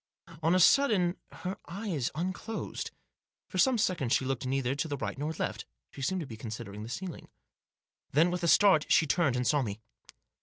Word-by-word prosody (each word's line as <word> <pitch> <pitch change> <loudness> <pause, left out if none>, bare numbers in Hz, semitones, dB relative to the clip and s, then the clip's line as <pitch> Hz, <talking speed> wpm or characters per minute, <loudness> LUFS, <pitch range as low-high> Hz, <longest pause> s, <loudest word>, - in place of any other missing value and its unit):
On 165 +3 +3
a - - +4
sudden 190 -5 +4 0.2
her 185 +1 -5
eyes 175 - -2
unclosed. 185 +6 -4 0.6
For - - -3
some 260 -3 +4
seconds 175 - +1
she 130 - +2
looked 130 -1 -2
neither 130 -1 0
to 145 +3 -2
the 145 -2 -3
right - - -3
nor 150 +3 -3
left. - - -3 0.3
She 140 - -9
seemed 185 +7 0
to - - -4
be 115 -4 -9
considering 110 -2 -7
the 110 - -7
ceiling. 180 +7 -6 0.8
Then, 165 +5 +3
with 180 -1 -2
a 170 - 0
start, 185 -3 +5
she 165 - +6
turned 150 -3 +2
and 125 0 0
saw 145 +2 +3
me. 105 -4 -4
155 Hz, 190 wpm, -30 LUFS, 130-185 Hz, 0.8 s, she